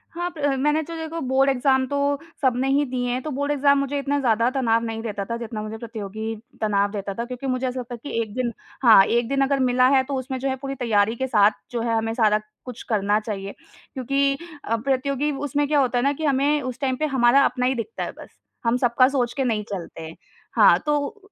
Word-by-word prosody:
हाँ, 350 Hz, +1 st, -2 dB
प -, -, -8 dB, 0.2 s
मैंने 295 Hz, +3 st, +2 dB
तो 335 Hz, +2 st, -8 dB
देखो 320 Hz, +1 st, -5 dB
बोर्ड 265 Hz, +1 st, +3 dB
एग्ज़ाम 265 Hz, 0 st, +2 dB
तो 285 Hz, -, -2 dB, 0.4 s
सबने 260 Hz, -1 st, +1 dB
ही 280 Hz, +2 st, +3 dB
दिए 250 Hz, -1 st, -2 dB
हैं 250 Hz, +1 st, -1 dB
तो 305 Hz, -, -4 dB
बोर्ड 285 Hz, +2 st, -1 dB
एग्ज़ाम 280 Hz, 0 st, +3 dB
मुझे 280 Hz, +1 st, -1 dB
इतना 285 Hz, +1 st, -1 dB
ज़्यादा 230 Hz, -2 st, +2 dB
तनाव 230 Hz, -4 st, +1 dB
नहीं 225 Hz, -1 st, -4 dB
देता 205 Hz, -3 st, -4 dB
था 230 Hz, +3 st, -3 dB
जितना 230 Hz, -2 st, -5 dB
मुझे 215 Hz, +1 st, -6 dB
प्रतियोगी 220 Hz, -1 st, -5 dB, 0.3 s
तनाव 205 Hz, -2 st, +1 dB
देता 200 Hz, -1 st, -4 dB
था। 235 Hz, +4 st, -4 dB
क्योंकि 250 Hz, +2 st, -6 dB
मुझे 255 Hz, 0 st, -1 dB
ऐसा 255 Hz, 0 st, -3 dB
लगता 245 Hz, 0 st, -7 dB
है -, -, -13 dB
कि 230 Hz, -5 st, -2 dB
1 215 Hz, -2 st, -6 dB
दिन 250 Hz, -2 st, -1 dB, 0.3 s
हाँ, 225 Hz, -5 st, +8 dB
1 235 Hz, +2 st, +1 dB
दिन 275 Hz, 0 st, +1 dB
अगर 275 Hz, 0 st, 0 dB
मिला 255 Hz, 0 st, +3 dB
है 265 Hz, -, +4 dB
तो 275 Hz, +1 st, -4 dB
उसमें 260 Hz, +1 st, -5 dB
जो 270 Hz, +1 st, -1 dB
है 265 Hz, -, -1 dB
पूरी 275 Hz, -1 st, -4 dB
तैयारी 225 Hz, -3 st, +1 dB
के 265 Hz, +2 st, -2 dB
साथ 210 Hz, -4 st, +4 dB, 0.2 s
जो 240 Hz, -2 st, -2 dB
है 230 Hz, 0 st, 0 dB
हमें 225 Hz, 0 st, -1 dB
सारा 215 Hz, -2 st, +3 dB, 0.3 s
कुछ 250 Hz, -2 st, -8 dB
करना 210 Hz, -1 st, +2 dB
चाहिए। 200 Hz, -2 st, -5 dB, 0.4 s
क्योंकि 275 Hz, +1 st, 0 dB, 0.3 s
अ, 230 Hz, -, 0 dB
प्रतियोगी 275 Hz, +4 st, -1 dB, 0.2 s
उसमें 290 Hz, +1 st, 0 dB
क्या 295 Hz, 0 st, +2 dB
होता 255 Hz, -2 st, +1 dB
है 245 Hz, -, +1 dB
ना 280 Hz, +1 st, +2 dB
कि 315 Hz, +2 st, -4 dB
हमें 285 Hz, +1 st, +2 dB
उस 255 Hz, -1 st, -5 dB
टाइम 265 Hz, -2 st, 0 dB
पे 310 Hz, -, 0 dB
हमारा 240 Hz, +2 st, +5 dB
अपना 250 Hz, -1 st, 0 dB
ही 260 Hz, +1 st, +1 dB
दिखता 240 Hz, -, -4 dB
है -, -, -4 dB
बस, -, -, -13 dB, 0.4 s
हम 230 Hz, +1 st, +3 dB
सबका 250 Hz, 0 st, +4 dB
सोच 250 Hz, -4 st, -1 dB
के 270 Hz, -, +1 dB
नहीं 225 Hz, -4 st, 0 dB
चलते। 165 Hz, -4 st, -7 dB, 0.4 s
हाँ, -, -, +7 dB
तो 300 Hz, +8 st, -2 dB
255 Hz, 235 wpm, -23 LUFS, 225-275 Hz, 0.4 s, हाँ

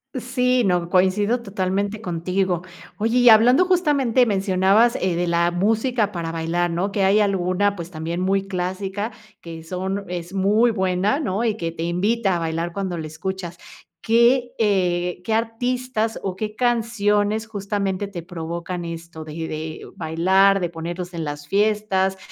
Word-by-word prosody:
Sí, 250 Hz, 0 st, +1 dB
no, 175 Hz, -2 st, +1 dB
coincido 205 Hz, +6 st, +2 dB
totalmente 200 Hz, +1 st, -2 dB
contigo. 180 Hz, -1 st, -1 dB, 0.3 s
Oye 225 Hz, +3 st, +1 dB
y 245 Hz, -1 st, +7 dB
hablando 245 Hz, +9 st, +6 dB
justamente 290 Hz, -9 st, +3 dB
mencionabas 195 Hz, +3 st, +3 dB
eh 185 Hz, -2 st, 0 dB
de 175 Hz, +1 st, -1 dB
la 170 Hz, 0 st, +2 dB
música 220 Hz, +4 st, +1 dB
para 170 Hz, -4 st, -4 dB
bailar 165 Hz, +1 st, -1 dB
¿no?, 180 Hz, +4 st, -1 dB
que 195 Hz, 0 st, 0 dB
hay 195 Hz, +2 st, +4 dB
alguna 200 Hz, 0 st, +1 dB
pues 170 Hz, -1 st, -7 dB
también 165 Hz, +1 st, -4 dB
muy 195 Hz, +1 st, 0 dB
clásica 190 Hz, +3 st, -3 dB, 0.3 s
que 165 Hz, -4 st, -9 dB
son 190 Hz, +4 st, -4 dB
es 175 Hz, 0 st, -6 dB
muy 210 Hz, +5 st, +3 dB
buena 190 Hz, +4 st, 0 dB
¿no?, 215 Hz, -7 st, -1 dB
y 220 Hz, -2 st, 0 dB
que 165 Hz, -5 st, -3 dB
te 165 Hz, 0 st, -5 dB
invita 195 Hz, +4 st, +1 dB
a -, -, -1 dB
bailar 165 Hz, +1 st, -2 dB
cuando 190 Hz, -2 st, -3 dB
la 160 Hz, -, -5 dB
escuchas. 175 Hz, +2 st, -5 dB, 0.4 s
¿Qué, 240 Hz, +2 st, +3 dB
eh, 180 Hz, -4 st, 0 dB
qué 220 Hz, -, 0 dB
artistas 230 Hz, 0 st, -1 dB
o 190 Hz, -2 st, -3 dB
qué 215 Hz, +1 st, -4 dB
canciones 220 Hz, -3 st, +1 dB
justamente 200 Hz, -2 st, -2 dB
te 180 Hz, -4 st, -7 dB
provocan 170 Hz, +1 st, -5 dB
esto 165 Hz, -1 st, -7 dB
de 155 Hz, -, -9 dB
de 155 Hz, 0 st, -6 dB
bailar, 190 Hz, +5 st, +3 dB
de 175 Hz, -2 st, -1 dB
ponerlos 175 Hz, +2 st, -6 dB
en 165 Hz, -1 st, -4 dB
las 145 Hz, -1 st, -6 dB
fiestas? 200 Hz, -1 st, +1 dB
190 Hz, 155 wpm, -22 LUFS, 175-220 Hz, 0.4 s, y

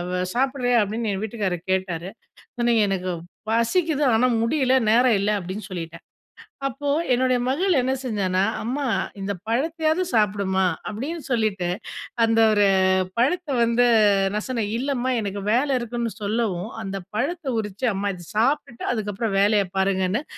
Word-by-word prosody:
வ 180 Hz, -, -1 dB, 0.2 s
சாப்பிடுரியா? 250 Hz, -1 st, +1 dB
அப்டின்னு 215 Hz, +2 st, -2 dB
என் 195 Hz, +1 st, -3 dB
வீட்டுக்காரர் 195 Hz, -6 st, -3 dB
கேட்டாரு. 185 Hz, -2 st, -2 dB, 0.5 s
சொன்னேன், 235 Hz, -1 st, +3 dB
"எனக்கு 185 Hz, -2 st, -2 dB, 0.4 s
பசிக்குது. 290 Hz, +7 st, +1 dB
ஆனா 250 Hz, +3 st, +3 dB
முடியல, 260 Hz, +1 st, +2 dB, 0.2 s
நேரம் 240 Hz, 0 st, +5 dB
இல்ல" 205 Hz, +2 st, +1 dB
அப்டின்னு 190 Hz, +3 st, -6 dB
சொல்லிட்டேன். 170 Hz, -2 st, -7 dB, 0.6 s
அப்போ 280 Hz, +3 st, -5 dB, 0.3 s
என்னுடய 255 Hz, 0 st, +2 dB
மகள் 335 Hz, +6 st, +2 dB
என்ன 255 Hz, +1 st, 0 dB
செஞ்சான்னா 195 Hz, -6 st, 0 dB, 0.2 s
"அம்மா, 270 Hz, +5 st, -2 dB, 0.4 s
இந்த 195 Hz, +1 st, -2 dB, 0.2 s
பழத்தயாவது 315 Hz, +8 st, 0 dB
சாப்புடுமா" 200 Hz, -3 st, +1 dB, 0.3 s
அப்டின்னு 290 Hz, +10 st, -5 dB
சொல்லிட்டு, 215 Hz, -7 st, 0 dB, 0.6 s
அந்த 225 Hz, 0 st, +2 dB
ஒரு 205 Hz, -1 st, +4 dB, 0.5 s
பழத்த 325 Hz, +8 st, +1 dB, 0.2 s
வந்து 235 Hz, +1 st, +3 dB, 0.5 s
நான் 210 Hz, -, -2 dB
சொன்னேன், 230 Hz, -5 st, -1 dB
இல்லம்மா 260 Hz, -1 st, -1 dB
எனக்கு 200 Hz, 0 st, -4 dB
வேல 255 Hz, +5 st, +2 dB
இருக்குன்னு 235 Hz, -1 st, -3 dB
சொல்லவும், 205 Hz, -2 st, -1 dB
அந்த 195 Hz, -1 st, -4 dB, 0.2 s
பழத்த 300 Hz, +10 st, -2 dB
உரிச்சு 210 Hz, +3 st, -3 dB
அம்மா 200 Hz, +1 st, -1 dB
இத 175 Hz, -1 st, -12 dB
சாப்ட்டுட்டு 240 Hz, +1 st, 0 dB
அதுக்கப்புறம் 210 Hz, -1 st, -2 dB
வேலய 205 Hz, 0 st, +4 dB
பாருங்கன்னு, 190 Hz, +4 st, +1 dB
225 Hz, 135 wpm, -23 LUFS, 200-255 Hz, 0.6 s, நேரம்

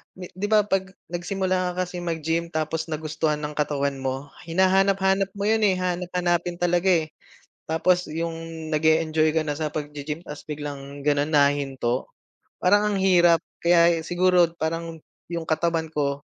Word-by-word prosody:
di 180 Hz, -1 st, -9 dB
'di 190 Hz, +2 st, -3 dB
ba 215 Hz, -1 st, +5 dB
'pag 190 Hz, -1 st, -1 dB, 0.2 s
nagsimula 185 Hz, +1 st, -1 dB
ka 185 Hz, +1 st, -1 dB
kasi 180 Hz, 0 st, -6 dB
mag-gym, 165 Hz, -1 st, -2 dB
tapos 160 Hz, 0 st, -2 dB
nagustuhan 155 Hz, -1 st, -2 dB
ng 150 Hz, 0 st, -4 dB
katawan 140 Hz, -2 st, 0 dB
mo, 135 Hz, +1 st, -4 dB, 0.2 s
hinahanap-hanap 190 Hz, +2 st, +3 dB
mo 200 Hz, -, -4 dB
'yon, 220 Hz, 0 st, +2 dB
eh. 190 Hz, -2 st, +3 dB
Hahanap-hanapin 175 Hz, -1 st, -1 dB
talaga, 175 Hz, +1 st, +2 dB
eh. -, -, -8 dB, 0.6 s
Tapos 180 Hz, +3 st, +2 dB
'yong 165 Hz, 0 st, -5 dB
nag-e-enjoy 155 Hz, 0 st, +2 dB
ka 160 Hz, -, +3 dB
na 150 Hz, -1 st, -3 dB
sa 155 Hz, -1 st, -1 dB
pag-ge-gym 150 Hz, +1 st, -5 dB
tas 150 Hz, -3 st, -9 dB
biglang 145 Hz, -2 st, -7 dB
gano'n 145 Hz, 0 st, +2 dB
nahinto, 140 Hz, -4 st, +1 dB, 0.6 s
parang 205 Hz, +3 st, +3 dB
ang -, -, 0 dB
hirap. 175 Hz, -3 st, +5 dB, 0.2 s
Kaya 170 Hz, -1 st, +4 dB
e 160 Hz, -, -8 dB
siguro 180 Hz, 0 st, +3 dB
parang 165 Hz, 0 st, -4 dB, 0.3 s
'yong 170 Hz, -1 st, -3 dB
katawan 165 Hz, 0 st, 0 dB
ko 140 Hz, -2 st, -1 dB
165 Hz, 150 wpm, -24 LUFS, 150-180 Hz, 0.6 s, ba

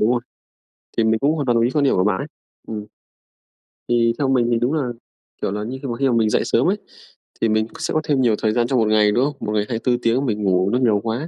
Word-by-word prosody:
Đúng 110 Hz, -, +3 dB
rồi. 120 Hz, -, 0 dB, 0.8 s
Thì 115 Hz, -, +3 dB
mình 110 Hz, 0 st, +2 dB
cũng 145 Hz, +5 st, +2 dB
hoàn 145 Hz, -, -2 dB
toàn 120 Hz, -2 st, +2 dB
đồng 115 Hz, -, +3 dB
ý 120 Hz, -, +1 dB
quan 150 Hz, -, +1 dB
điểm 140 Hz, -, +3 dB
của 90 Hz, -, +2 dB
bạn 100 Hz, -2 st, +1 dB
ấy, -, -, -5 dB, 0.4 s
ừm. 105 Hz, -2 st, -5 dB, 1.0 s
Thì 115 Hz, -1 st, +3 dB
theo 140 Hz, -, +1 dB
mình 125 Hz, -3 st, +2 dB
thì 120 Hz, -, +3 dB
đúng 120 Hz, +5 st, 0 dB
là, 155 Hz, -3 st, 0 dB, 0.6 s
kiểu -, -, -1 dB
là 105 Hz, +1 st, -3 dB
như, 125 Hz, +5 st, -5 dB
khi 140 Hz, -, -5 dB
mà 120 Hz, -2 st, -3 dB
khi 135 Hz, +1 st, +1 dB
mà 120 Hz, -, +1 dB
mình 110 Hz, -2 st, +2 dB
dậy -, -, +2 dB
sớm -, -, +2 dB
ấy, -, -, +1 dB, 0.6 s
thì 115 Hz, -, +2 dB
mình 110 Hz, +1 st, +1 dB
sẽ -, -, -2 dB
có 155 Hz, -, +1 dB
thêm 145 Hz, -3 st, +1 dB
nhiều 115 Hz, -4 st, +3 dB
thời 110 Hz, -1 st, +2 dB
gian 120 Hz, -1 st, +1 dB
trong 130 Hz, -1 st, +1 dB
một 110 Hz, -, +2 dB
ngày, 105 Hz, -1 st, +4 dB
đúng 120 Hz, +5 st, +2 dB
không? 145 Hz, -1 st, -3 dB
Một 105 Hz, -, -4 dB
ngày 105 Hz, -1 st, +1 dB
24 120 Hz, +1 st, -1 dB
tiếng 125 Hz, +4 st, +1 dB
mình 105 Hz, -4 st, -2 dB
ngủ 95 Hz, -1 st, +2 dB
nó 120 Hz, +4 st, +1 dB
nhiều 110 Hz, -5 st, +3 dB
quá, 115 Hz, +7 st, -3 dB
115 Hz, 285 wpm, -21 LUFS, 110-130 Hz, 1.0 s, ngày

